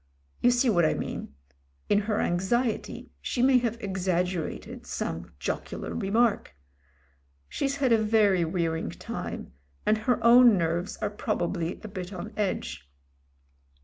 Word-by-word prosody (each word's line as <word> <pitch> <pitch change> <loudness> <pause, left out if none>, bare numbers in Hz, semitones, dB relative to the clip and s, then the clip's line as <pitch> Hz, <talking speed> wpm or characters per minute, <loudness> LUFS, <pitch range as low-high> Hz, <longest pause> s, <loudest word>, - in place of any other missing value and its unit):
You 245 - +5
see 245 +1 +3
what 175 -7 +4
I 155 - +3
mean: 70 - -5 0.5
in 205 - +4
her 210 0 -1
anxiety 215 +7 -1
she 245 - -1
may 260 -1 +6
have 235 -1 -1
exaggerated 180 -4 -2
some 85 +1 -4
jocular 70 - -4
remark. 210 - +1 0.9
She's 275 - -1
had 270 -3 +1
a 225 -1 +5
very 210 -4 +3
wearing 165 -1 -1
time, - - -6 0.3
and 215 0 +3
her 240 +3 +1
own 235 -2 +8
nerves 170 +2 -1
are 205 - 0
proba 175 -4 -1
bly 170 -1 -3
a - - -5
bit 185 -3 -6
on 180 - -7
edge. 85 - -3
200 Hz, 140 wpm, -27 LUFS, 175-230 Hz, 0.9 s, own